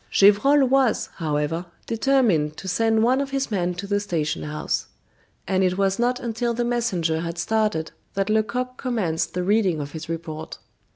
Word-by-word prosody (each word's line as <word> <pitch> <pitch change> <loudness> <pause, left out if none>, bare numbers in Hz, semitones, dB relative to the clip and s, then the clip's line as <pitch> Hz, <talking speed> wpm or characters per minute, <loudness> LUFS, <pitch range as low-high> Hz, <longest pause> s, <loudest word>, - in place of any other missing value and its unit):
Gevrol 265 +9 +5
was, 260 -2 +2
however, 160 +1 -1 0.2
determined 225 - +2
to 190 - -8
send 220 +3 +2
one 255 +4 +3
of 280 - -3
his 275 -2 -2
men 180 -3 0
to 190 +3 -5
the 205 0 0
station 165 -7 -2
house; 150 0 -3 0.6
and 190 +1 +2
it 185 0 +1
was 195 +1 +1
not 245 +1 +1
until 235 0 -2
the 240 +1 0
messenger 190 -10 0
had 170 +1 -4
started 210 -3 0 0.2
that 195 0 0
Lecoq 235 +4 0
commenced 200 -13 -1
the 180 - 0
reading 195 -4 +2
of 145 -1 -5
his 160 0 -7
report. 160 -1 -5
200 Hz, 170 wpm, -23 LUFS, 165-235 Hz, 0.6 s, Gevrol